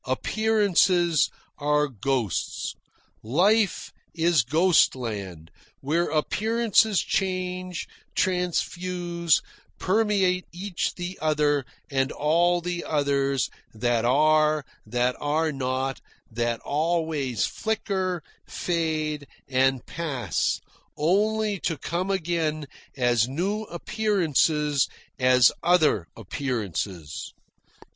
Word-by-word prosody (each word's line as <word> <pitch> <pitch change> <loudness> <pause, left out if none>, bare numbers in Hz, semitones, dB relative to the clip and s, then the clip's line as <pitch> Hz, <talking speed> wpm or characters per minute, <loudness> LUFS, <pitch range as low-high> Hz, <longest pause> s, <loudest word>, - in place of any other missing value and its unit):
Appearances 185 - +2 0.3
are 150 0 +2
ghosts. 125 - -2 0.5
Life 195 - +2 0.2
is 165 -3 +3
ghost 160 +10 +4
land, 100 -10 -6 0.3
where 165 +5 0
appearances 220 +5 +2
change, 185 -1 -2 0.3
transfuse, 175 -2 0 0.3
permeate 190 -3 +1
each 180 +1 -3
the 180 +1 -6
other 150 -3 +1 0.2
and 135 0 +1
all 175 +4 +2
the 175 0 -3
others, 140 -4 +1 0.3
that 120 0 +1
are, 155 +3 +3 0.2
that 125 +3 +1
are 155 +2 0
not, 130 -1 -2 0.3
that 120 +1 -1
always 155 -5 0
flicker, 190 -6 -2 0.2
fade, 155 -4 -2 0.2
and 130 -1 +2
pass, 135 - -2 0.4
only 210 +5 +1
to 165 - -2
come 175 +7 -3
again 165 -5 -1 0.3
as 120 -3 +3
new 195 +10 -2
appearances, 160 - +1 0.3
as 125 -2 +6
other 160 - +3
appearances. 100 - -4
155 Hz, 85 wpm, -25 LUFS, 130-180 Hz, 0.5 s, as